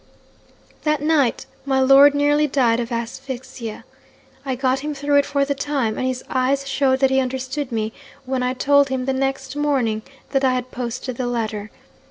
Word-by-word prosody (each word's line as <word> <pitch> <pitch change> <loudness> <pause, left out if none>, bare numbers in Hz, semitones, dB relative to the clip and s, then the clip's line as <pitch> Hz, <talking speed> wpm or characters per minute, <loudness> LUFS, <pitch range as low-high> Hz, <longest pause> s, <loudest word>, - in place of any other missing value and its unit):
'"That 305 -1 +1
night 300 -6 +2 0.2
my 270 -1 +1
lord 275 +2 +7
nearly 290 +1 +3
died 245 -4 +2
of 240 +1 -4
asphyxia. 240 -1 -6 0.6
I 265 -2 -2
got 260 +1 +1
him 295 +1 -4
through 285 +1 +1
it 285 - +3
for 280 -1 +1
the 280 - 0
time; 275 -5 -1
and 260 - -1
his 255 0 -3
eyes 270 +2 0
showed 270 -1 +1
that 270 -1 +4
he 265 - +3
understood 260 +1 -3
me 220 -1 -2 0.3
when 260 0 -1
I 250 +1 0
told 285 +1 +3
him, 260 -1 -2
the 270 - 0
next 270 0 -2
morning, 265 -7 0 0.3
that 270 -1 +1
I 255 -1 +3
had 255 0 -4
posted 245 0 -5
the 255 - -2
letter. 220 -3 -3
265 Hz, 185 wpm, -21 LUFS, 250-280 Hz, 0.6 s, lord